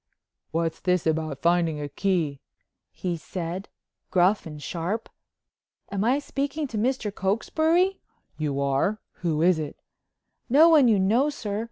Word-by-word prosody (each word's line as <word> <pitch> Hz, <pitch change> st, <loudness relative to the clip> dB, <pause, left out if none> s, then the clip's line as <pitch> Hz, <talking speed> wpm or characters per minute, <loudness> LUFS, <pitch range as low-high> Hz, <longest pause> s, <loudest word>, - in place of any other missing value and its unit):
"What's 165 Hz, 0 st, -1 dB
this 180 Hz, -2 st, +1 dB
about 155 Hz, -3 st, -1 dB
finding 170 Hz, -2 st, +2 dB
a 145 Hz, -, -3 dB
key?" 155 Hz, -2 st, -1 dB, 0.5 s
he 175 Hz, -2 st, -3 dB
said 175 Hz, +3 st, -5 dB, 0.4 s
gruff 185 Hz, +1 st, +3 dB
and 150 Hz, -2 st, -8 dB
sharp. 175 Hz, +9 st, -3 dB, 0.8 s
"Am 200 Hz, 0 st, -1 dB
I 250 Hz, +5 st, +3 dB
speaking 285 Hz, +1 st, -2 dB
to 225 Hz, -, -4 dB
Mr. 235 Hz, -3 st, 0 dB
Cokesbury?" 315 Hz, -, +1 dB, 0.4 s
"You 145 Hz, -3 st, -2 dB
are. 140 Hz, +10 st, +1 dB, 0.2 s
Who 160 Hz, -3 st, 0 dB
is 175 Hz, -2 st, +4 dB
it?" 150 Hz, -2 st, -5 dB, 0.7 s
"No 305 Hz, +7 st, +7 dB
one 300 Hz, -6 st, +6 dB
you 220 Hz, -3 st, +4 dB
know, 225 Hz, +10 st, +3 dB
sir. 210 Hz, -8 st, -4 dB
185 Hz, 140 wpm, -26 LUFS, 160-235 Hz, 0.8 s, No